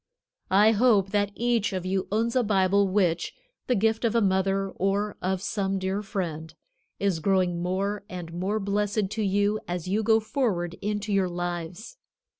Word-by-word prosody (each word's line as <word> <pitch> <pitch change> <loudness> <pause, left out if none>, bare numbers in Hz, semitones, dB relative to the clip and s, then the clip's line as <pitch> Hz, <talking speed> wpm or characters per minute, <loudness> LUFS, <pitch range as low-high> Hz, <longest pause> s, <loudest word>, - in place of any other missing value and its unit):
I 205 +3 +5
hope 210 -4 +3
that 205 -1 +1
each 235 -3 0
of 185 -1 -3
you 190 0 -1
owns 230 +3 0
a 255 - +4
Bible 200 -2 +3
which, 180 -4 0 0.3
the 250 - +2
gift 220 +2 +1
of 230 -1 +1
a - - +5
mother 195 -1 +1
or 200 +3 -1
of 190 0 -1
some 195 -2 -1
dear 190 +2 -2
friend, 165 -6 -4 0.5
is 195 -4 +1
growing 180 -1 +1
more 195 +3 -1
and 175 -4 -7
more 190 +5 -1
blessed 205 0 -1
to 220 - -2
you 205 +1 +1
as 175 0 -4
you 205 +4 +1
go 220 +1 +4
forward 215 -7 -1
into 210 0 -2
your 190 -2 +2
lives. 175 - -5
195 Hz, 170 wpm, -26 LUFS, 185-210 Hz, 0.5 s, I